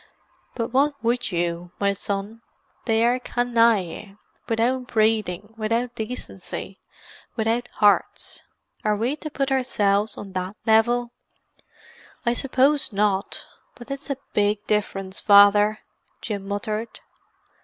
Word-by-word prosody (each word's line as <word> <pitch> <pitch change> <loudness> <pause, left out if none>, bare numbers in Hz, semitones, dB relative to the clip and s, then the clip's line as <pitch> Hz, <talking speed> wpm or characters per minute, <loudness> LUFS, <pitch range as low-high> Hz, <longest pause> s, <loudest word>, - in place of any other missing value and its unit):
"But 230 -1 -2
what 285 +2 +3
would 240 -1 0
you, 175 0 -2
my 200 0 +2
son? 200 +3 -4 0.4
They 225 0 +3
are 245 +1 +2
canaille—without 230 +1 0
breeding, 215 -3 0
without 230 +3 -1
decency, 235 +3 -6 0.6
without 230 +2 0
hearts. 205 -1 +2 0.4
Are 210 0 +2
we 235 +7 -1
to 310 - -6
put 275 -2 -2
ourselves 210 -5 +1
on 195 - -8
that 185 +2 -3
level?" 235 +2 +3 1.1
"I 235 - +3
suppose 275 +3 +2
not—but 205 +5 -3
it's 275 +2 -6
a 275 - -1 0.2
big 205 0 +1
difference, 195 -2 -1
Father," 205 +1 +6 0.4
Jim 200 -3 -5
muttered. 215 +3 -3
220 Hz, 110 wpm, -24 LUFS, 205-245 Hz, 1.1 s, Father